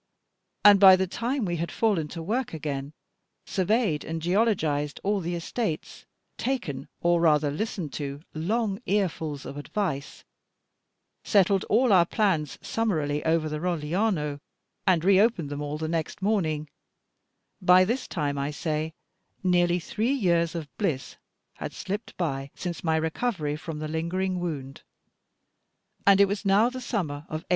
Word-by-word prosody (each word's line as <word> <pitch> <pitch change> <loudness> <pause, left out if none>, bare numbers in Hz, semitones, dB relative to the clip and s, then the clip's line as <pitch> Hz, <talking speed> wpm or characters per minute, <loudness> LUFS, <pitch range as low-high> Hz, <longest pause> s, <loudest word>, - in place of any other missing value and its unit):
and 205 -1 +9
by 190 -1 +10
the 190 0 +1
time 240 +6 -2
we 175 -2 -1
had 170 +1 -3
fallen 200 -9 +1
to 165 +2 -7
work 225 +2 -2
again, 140 -2 -4 0.5
surveyed 195 -4 +1
and 165 0 -4
geologised 165 -6 +1
all 205 +1 +1
the 175 -1 -3
estates, 170 0 -4 0.3
taken, 200 - -2
or 175 0 +3
rather 150 -3 +3
listened 170 -2 -3
to, 140 -1 -4
long 200 +5 -1
earfuls 160 -8 -1
of 140 - -7
advice, 145 -2 -3 1.0
settled 195 -2 +3
all 235 0 +3
our 175 -2 +6
plans 170 - 0
summarily 155 -10 -1
over 160 -1 +2
the 150 0 -3
Rogliano, 165 -2 -1 0.5
and 175 -3 +3
reopened 195 -5 +3
them 145 0 -4
all 145 +1 -3
the 160 0 -3
next 160 -1 -2
morning, 170 -7 0 0.9
by 180 0 +6
this 245 +6 -2
time, 145 -4 -2
I 140 +1 -1
say, 155 +1 -3 0.5
nearly 175 -1 +3
three 220 +8 -1
years 170 -9 +1
of 160 -3 -4
bliss 160 -11 -1 0.4
had - - -5
slipped 205 +4 -5
by, 135 -6 -2
since 175 -2 -5
my 160 -2 +2
recovery 160 -1 -1
from 155 +1 -6
the 155 0 -4
lingering 180 +4 -1
wound; 145 -6 -5 1.3
and 200 -1 +7
it 200 - +8
was 200 +2 -3
now 205 +5 +4
the 255 0 -6
summer 185 - -2
of 155 +1 -5
1833. - - -44
170 Hz, 150 wpm, -27 LUFS, 150-200 Hz, 1.3 s, by